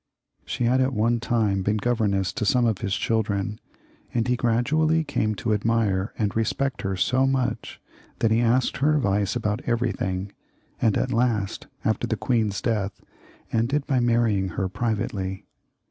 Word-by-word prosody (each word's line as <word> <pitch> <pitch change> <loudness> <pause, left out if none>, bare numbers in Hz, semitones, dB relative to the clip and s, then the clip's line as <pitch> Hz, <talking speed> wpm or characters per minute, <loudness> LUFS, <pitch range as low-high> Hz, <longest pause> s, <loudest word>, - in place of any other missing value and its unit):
She - - -2
had 125 +2 +3
at 130 +1 +1
one 115 +1 +2
time 110 -4 +1
been 105 +3 +1
governess 105 -5 0
to - - -3
some 120 +3 +3
of 110 -4 +1
his 100 -4 -1
children, 105 -2 -1 0.6
and 115 0 +1
he 125 - +2
gradually 155 +8 +2
came 110 -7 -1
to 110 +2 -1
admire 105 -2 +1
and 105 -3 -1
respect 120 +4 -1
her 95 -1 -2
so 130 +7 +2
much 135 -2 -1 0.4
that 110 - +1
he 115 +1 +3
asked 120 +2 +2
her 150 +3 +3
advice 100 -7 +1
about 105 -1 -1
everything, 100 -5 -1 0.5
and 110 -3 +3
at 130 - -1
last, 115 -4 0 0.2
after - - +1
the - - -1
queen's 110 -6 0
death, 105 -4 -1 0.5
ended 135 +6 +1
by 130 -2 +1
marrying 115 -5 +2
her 95 - 0
privately. 100 -3 -3
115 Hz, 160 wpm, -25 LUFS, 100-120 Hz, 0.6 s, had